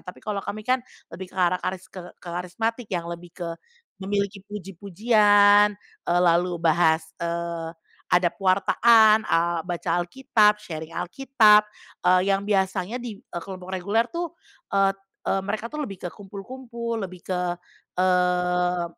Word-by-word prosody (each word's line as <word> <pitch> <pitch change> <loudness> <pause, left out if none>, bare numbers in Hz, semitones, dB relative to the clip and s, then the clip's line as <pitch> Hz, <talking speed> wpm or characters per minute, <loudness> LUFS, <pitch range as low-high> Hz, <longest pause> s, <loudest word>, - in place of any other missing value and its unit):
tapi 180 - -12
kalau 205 -2 -2
kami 215 +2 -6
kan 255 +2 +2 0.3
lebih 185 -1 -8
ke - - -18
arah 180 0 +2
karis 185 0 -4
ke 185 - -7 0.2
ke 175 - -13
karismatik 225 +7 -3
yang 175 -3 -2
lebih 170 +1 -7
ke 170 -2 -4 0.5
memiliki 200 0 -2
puji-pujian, 205 +1 +3 0.3
eee, 175 +1 +3
lalu 175 +1 +2
bahas, 160 -1 +3 0.2
eee, 170 -1 -3 0.5
ada 180 -1 +4
pewartaan, 215 +3 +4
eee, 170 +1 +1
baca 175 -2 -3
Alkitab, 210 +2 +2
sharing 160 -2 -7
Alkitab, 210 +2 +4 0.4
eee, 185 +2 +4
yang 195 +1 0
biasanya 195 +3 0
di, 225 -5 -7
eee, 175 -8 -8
kelompok 185 -1 -8
reguler 205 +6 +1
tuh 340 0 -3 0.4
et 195 0 +3 0.3
e - - 0
mereka 210 +3 -3
tuh 300 - -4
lebih 195 -9 -6
ke - - -1
kumpul-kumpul, 235 +3 -6
lebih 185 -3 -7
ke, 180 -1 -2 0.4
eee 180 -1 +2
190 Hz, 140 wpm, -24 LUFS, 175-210 Hz, 0.5 s, ada